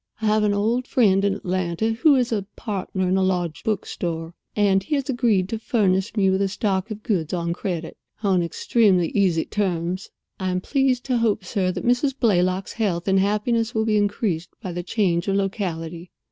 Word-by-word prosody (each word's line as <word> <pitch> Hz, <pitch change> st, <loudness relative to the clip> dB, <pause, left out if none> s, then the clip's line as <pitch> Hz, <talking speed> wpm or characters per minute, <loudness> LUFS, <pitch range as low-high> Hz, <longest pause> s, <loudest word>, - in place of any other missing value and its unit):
I 220 Hz, -, -3 dB
have 215 Hz, 0 st, +3 dB
an 205 Hz, -1 st, +2 dB
old 230 Hz, +5 st, 0 dB
friend 200 Hz, -7 st, +3 dB
in 200 Hz, -1 st, +2 dB
Atlanta 185 Hz, +3 st, -1 dB
who 280 Hz, +6 st, +4 dB
is 250 Hz, -2 st, +1 dB
a 205 Hz, -3 st, -1 dB
partner 190 Hz, -3 st, -3 dB
in 185 Hz, +1 st, +2 dB
a -, -, +2 dB
large 175 Hz, -4 st, -1 dB
book 215 Hz, -2 st, -1 dB
store, 165 Hz, -1 st, -4 dB, 0.2 s
and 200 Hz, -2 st, +3 dB
he 250 Hz, +10 st, -2 dB
has 275 Hz, -1 st, -2 dB
agreed 225 Hz, -7 st, +2 dB
to 225 Hz, -, -3 dB
furnish 200 Hz, -2 st, +1 dB
me 195 Hz, -2 st, +4 dB
with 190 Hz, +1 st, +1 dB
a 200 Hz, -, +2 dB
stock 195 Hz, 0 st, -1 dB
of 215 Hz, -1 st, -7 dB
goods 175 Hz, -7 st, -1 dB
on 170 Hz, -1 st, -1 dB
credit, 175 Hz, -3 st, -4 dB, 0.3 s
on 190 Hz, -3 st, +3 dB
extremely 180 Hz, 0 st, +2 dB
easy 185 Hz, -5 st, +1 dB
terms. 185 Hz, -2 st, -2 dB, 0.3 s
I 190 Hz, -1 st, -1 dB
am 180 Hz, 0 st, 0 dB
pleased 265 Hz, +3 st, +1 dB
to 255 Hz, -2 st, 0 dB
hope, 215 Hz, -4 st, +1 dB
sir, 185 Hz, -1 st, 0 dB
that -, -, -5 dB
Mrs. 255 Hz, +3 st, +1 dB
Blaylock's 185 Hz, -4 st, +1 dB
health 190 Hz, -6 st, -1 dB
and 190 Hz, 0 st, +4 dB
happiness 220 Hz, +4 st, 0 dB
will 220 Hz, 0 st, +1 dB
be 215 Hz, -1 st, +2 dB
increased 205 Hz, -4 st, -1 dB
by 185 Hz, -, -5 dB
the 175 Hz, +1 st, -3 dB
change 175 Hz, -2 st, 0 dB
of 195 Hz, -, +1 dB
locality. 175 Hz, -4 st, -3 dB
195 Hz, 200 wpm, -23 LUFS, 180-220 Hz, 0.3 s, who